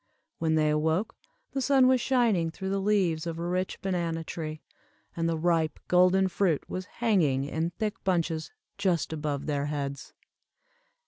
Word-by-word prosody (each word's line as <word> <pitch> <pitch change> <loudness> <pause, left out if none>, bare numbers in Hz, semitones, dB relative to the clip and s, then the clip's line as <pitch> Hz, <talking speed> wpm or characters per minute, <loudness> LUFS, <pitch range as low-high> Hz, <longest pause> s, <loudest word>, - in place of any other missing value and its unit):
When 160 -1 +1
they 155 -1 +3
awoke, 160 +6 0 0.4
the 270 - -2
sun 265 0 +4
was 255 -1 +4
shining 230 -11 +2
through 190 +4 -5
the 195 0 0
leaves 185 -6 +1
of 165 -1 -4
a 170 - -4
rich 185 +1 -2
banana 170 -4 -1
tree, 155 -1 -6 0.5
and 165 0 0
the 165 - 0
ripe 160 -2 +1
golden 185 +1 +4
fruit 180 -4 0
was 185 0 -4
hanging 170 - +1
in 160 +4 -2
thick 215 +5 -4
bunches 165 -4 0 0.3
just 180 -5 +1
above 150 -2 -3
their 145 -1 -1
heads. 140 -2 -4
170 Hz, 155 wpm, -28 LUFS, 155-190 Hz, 0.5 s, sun